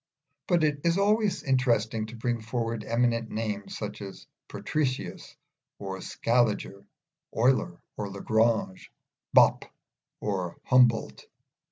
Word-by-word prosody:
But 175 -2 +3
it 145 -2 +1
is 170 +1 +2
always 205 -3 +2
interesting 115 -5 +1
to 115 - -9
bring 120 0 -2
forward 115 -1 -3
eminent 115 -1 0
names, 105 -2 -4
such 105 -1 -6
as 100 -1 -9 0.2
Patricius 130 -11 -3 0.4
or 95 -1 -6
Scaliger, 115 -4 0 0.5
Euler 120 -6 +2 0.2
or 105 -1 -3
Lagrange, 110 0 0 0.5
Bopp - - +6 0.5
or 95 -4 -3
Humboldt. 125 -3 +3
115 Hz, 110 wpm, -28 LUFS, 105-130 Hz, 0.5 s, Bopp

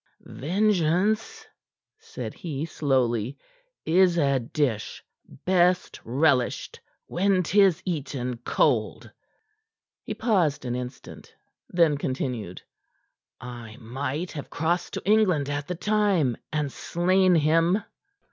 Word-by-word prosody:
"Vengeance," 205 - 0 0.5
said 450 0 -7
he 155 -3 -4
slowly, 130 -5 0 0.5
"is 180 +1 +4
a 140 -4 +2
dish 120 -2 -2 0.4
best 180 0 +2
relished 130 0 +1 0.3
when 190 +1 +1
'tis 190 -1 +3
eaten 135 -8 -3
cold." 120 - 0 0.9
He - - -6
paused 175 - +1
an 120 - -2
instant; 125 0 -8 0.3
then 165 -5 +3
continued: 125 -9 -4 0.8
"I 120 -2 -9
might 135 +8 -4
have 145 -4 -7
crossed 170 +3 -1
to - - -6
England 185 -9 +3
at 145 0 -3
the 180 - -3
time, 195 - +1 0.2
and 150 -3 -1
slain 185 +4 +2
him. 165 +6 +3
160 Hz, 100 wpm, -26 LUFS, 130-185 Hz, 0.9 s, is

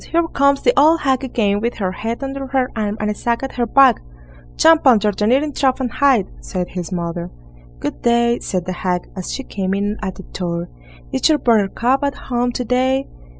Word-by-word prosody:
Here 335 0 +1
comes 280 -1 +2
the - - +4
old 320 +2 +5
hag 265 -1 +1
again 210 -6 0
with 235 +2 -2
her 190 -3 -2
head 225 +7 -4
under 270 0 -4
her 260 -1 0
arm, 210 -1 -2
and 210 0 -1
a - - -1
sack 235 +4 -2
at 270 - -3
her 240 -1 -2
back." 265 0 +5 0.6
"Jump 320 -3 +5
under 215 -4 +5
the 210 +1 -1
kneading 280 +5 +2
trough 265 -1 +1
and 250 -3 -2
hide", 265 -8 +3
said 180 -3 -4
his 180 -1 -6
mother. 170 -1 -4 0.5
"Good - - -5
day!" 235 0 +2
said 180 -2 -3
the 185 - -3
hag, 180 0 -3
as 185 -2 -5
she 270 - -4
came 195 -5 -3
in 205 +2 -1
at 190 - -4
the 190 - -10
door; 170 -2 -4 0.4
"is - - +2
your 310 - +4
Buttercup 235 +3 +1
at 280 0 -1
home 245 -1 -2
to 250 - -3
day?" 260 +3 +1
235 Hz, 210 wpm, -19 LUFS, 195-270 Hz, 0.6 s, old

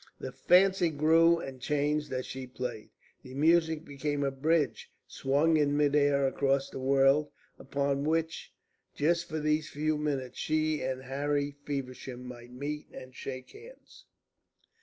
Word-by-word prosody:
The - - -5
fancy 185 -1 +4
grew 165 +3 +4
and 135 -5 -7
changed 150 +2 0
as 130 -1 -2
she 130 0 -7
played. 125 -3 -6 0.3
The 130 0 -11
music 160 +1 +3
became 145 0 -2
a 135 - 0
bridge 150 +2 0 0.2
swung 150 +4 +1
in 145 -1 +2
mid 145 -1 +3
air 140 -1 +3
across 135 0 +1
the - - -6
world, 135 +2 +3 0.3
upon 140 0 -1
which 160 +1 -1 0.4
just 170 +4 +1
for 160 -1 -2
these 155 0 0
few 155 +1 -1
minutes 140 -4 -3
she 155 0 0
and 130 0 -3
Harry 145 +2 -1
Feversham 130 -2 -5
might 120 -1 -10
meet 145 +4 -5
and 130 0 -10
shake 130 0 -7
hands. 460 +4 -15
145 Hz, 145 wpm, -30 LUFS, 135-155 Hz, 0.4 s, fancy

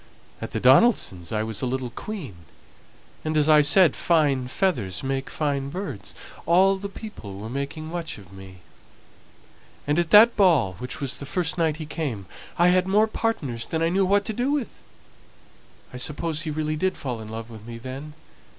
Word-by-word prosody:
At - - -4
the - - -3
Donaldsons' 130 - +4
I 110 0 0
was 110 -2 -2
a 130 - -1
little 125 -1 -3
queen; 160 - -7 0.9
and 155 0 -1
as 150 0 +3
I 155 -1 +7
said, 150 +2 +6
fine 145 -7 +2
feathers 125 - -1
make 135 0 -2
fine 140 -3 -2
birds, 140 - -6 0.2
and - - -16
all 190 +3 +4
the 200 +1 -6
people 195 - -9
were 110 +3 -7
making 140 +4 -4
much 170 0 -5
of 95 -2 -15
me; 95 -1 -12 1.2
and 150 +3 +1
at 170 -2 0
that 220 +5 +8
Ball, 165 - +3
which 125 +4 -6
was 140 -2 -1
the 140 - -7
first 180 -2 -1
night 160 -3 0
he 155 - -6
came, 145 - -4 0.3
I 175 +1 +5
had 185 +1 +3
more 210 +3 +4
partners 165 - -2
than 160 0 -1
I 165 - +2
knew 190 +3 +2
what 200 +2 +2
to 220 - -3
do 245 +5 -1
with. 285 -5 -3 1.1
I - - -6
suppose 155 +4 -2
he 155 - -4
really 155 0 -2
did 185 +4 -1
fall 125 -5 -4
in 110 - -9
love 115 +1 -7
with 110 0 -11
me 115 0 -7
then. 135 +5 -8
150 Hz, 190 wpm, -24 LUFS, 125-180 Hz, 1.2 s, that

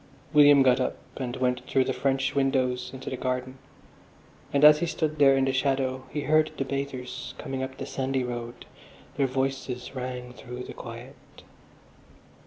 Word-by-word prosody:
William 145 -2 +7
got 130 -1 +4
up 130 - -1 0.2
and 125 -2 -3
went 125 -1 0
through 135 - +3
the - - -1
French 135 -1 0
windows 130 -2 +1
into 130 0 -10
the - - -2
garden, 130 0 -3 0.9
and 140 0 +2
as 150 0 +9
he 170 - 0
stood 155 -2 -2
there 135 -1 +6
in 135 - +3
the 135 - 0
shadow 130 -1 0
he 150 - -3
heard 155 +2 +3
the 135 - -1
bathers 130 -2 -5
coming 135 -2 -4
up 130 0 -5
the 135 - -5
sandy 135 -1 -1
road; 120 -1 -6 0.5
their 140 - +2
voices 130 -1 -3
rang 125 -1 -5
through 125 0 -8
the - - -8
quiet. - - -9
130 Hz, 170 wpm, -27 LUFS, 125-140 Hz, 0.9 s, as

